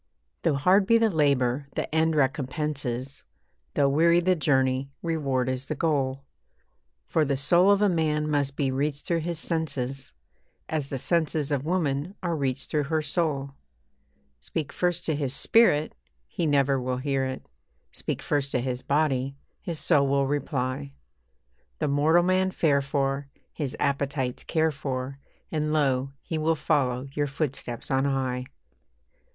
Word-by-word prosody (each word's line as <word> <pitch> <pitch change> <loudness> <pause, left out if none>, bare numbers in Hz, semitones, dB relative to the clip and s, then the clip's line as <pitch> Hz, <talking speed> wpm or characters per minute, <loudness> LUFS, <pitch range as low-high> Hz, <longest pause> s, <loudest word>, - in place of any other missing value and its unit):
Though 165 -4 +2
hard 185 +8 +4
be 230 - +6
the 225 -1 +3
labour, 140 -4 +1
the - - -1
end 160 0 +2
recompenses 135 -2 -1 0.5
Though 140 - +4
weary 165 +5 +4
the 185 +1 +2
journey, 135 -3 +1
reward 140 -6 0
is 130 +1 -2
the 155 - -2
goal. 140 -3 0 0.8
For 160 - +1
the 140 -2 0
soul 170 +8 +4
of 200 0 +4
a - - +5
man 155 -4 +1
must 140 -2 0
be 140 -3 0
reached 145 +2 -2
through 170 -1 +1
his 170 +1 -3
senses, 140 -5 -2 0.6
As 150 -3 -2
the 135 - -2
senses 155 0 0
of 140 +1 -1
woman 165 0 -1
are 170 -2 0
reached 135 -3 -2
through 150 -2 +1
her 155 +1 0
soul. 145 -3 -1 0.9
Speak 140 - -4
first 175 -1 0
to 160 - +1
his 140 -2 -1
spirit, 155 -10 +3 0.3
he 170 - -2
never 140 -2 +2
will 125 0 -2
hear 135 0 0
it; 130 0 -5 0.5
Speak - - -4
first 145 -2 0
to 125 - +2
his 125 0 -3
body, 140 -2 0 0.3
his 170 -2 -4
soul 145 -3 +3
will 140 0 +2
reply; 140 -1 -2 0.8
The - - -1
mortal 150 +5 +4
man 185 +1 +2
fare 150 -6 +2
for, 140 0 -1 0.3
his 140 -5 -4
appetites 140 -2 -1
care 160 -1 +1
for, 135 -2 -4 0.3
And 150 -1 -1
lo! 135 -3 +1
he 160 - -3
will 160 +1 +2
follow 140 -4 0
your 145 0 0
footsteps 135 -5 -4
on 135 +1 +2
high. 130 -2 -1
145 Hz, 155 wpm, -26 LUFS, 135-160 Hz, 0.9 s, be